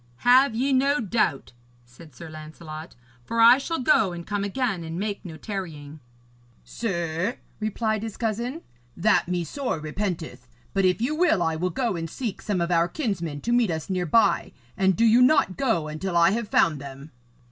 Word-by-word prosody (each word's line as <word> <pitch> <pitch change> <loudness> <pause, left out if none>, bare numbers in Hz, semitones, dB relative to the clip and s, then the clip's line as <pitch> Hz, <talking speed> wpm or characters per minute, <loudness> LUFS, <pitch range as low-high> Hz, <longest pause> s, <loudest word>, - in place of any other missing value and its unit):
'Have 250 0 +6
ye 265 +4 +1
no 275 +3 +3
doubt,' 210 - -1 0.3
said 125 +4 -16
Sir 170 - -9
Lancelot, 155 +1 -9 0.3
'for 230 - -3
I 235 +3 +8
shall 330 +4 -3
go 220 -8 +3
and 170 -1 -7
come 205 -1 -2
again 200 -3 -2
and 165 +1 -6
make 205 0 -3
no 165 -5 -8
tarrying.' 155 -8 -7 0.6
'Sir,' 175 -1 -2 0.2
replied 215 0 -1
his 220 -2 -6
cousin, 235 +7 -3 0.3
'that 210 +1 +3
me 180 -1 -1
sore 250 - -3
repenteth. 155 -6 -4 0.3
But 195 -1 +2
if 185 +4 +2
you 255 +6 0
will, 305 - +2
I 160 -1 0
will 180 +3 -1
go 220 +4 -1
and 165 -1 -4
seek 230 +2 -5
some 195 -4 -1
of 170 +1 -1
our 170 0 +3
kinsmen 175 - -3
to 235 - -2
meet 240 -3 +3
us 160 +2 -3
near 180 -2 -1
by. 170 -2 +2 0.2
And 190 -1 +2
do 230 - +3
you 230 +2 +5
not 250 -7 +4
go 225 - 0
until 170 +4 -3
I 170 +2 +5
have 230 +1 -2
found 155 -4 +2
them.' 140 +2 -10
190 Hz, 185 wpm, -25 LUFS, 165-230 Hz, 0.6 s, I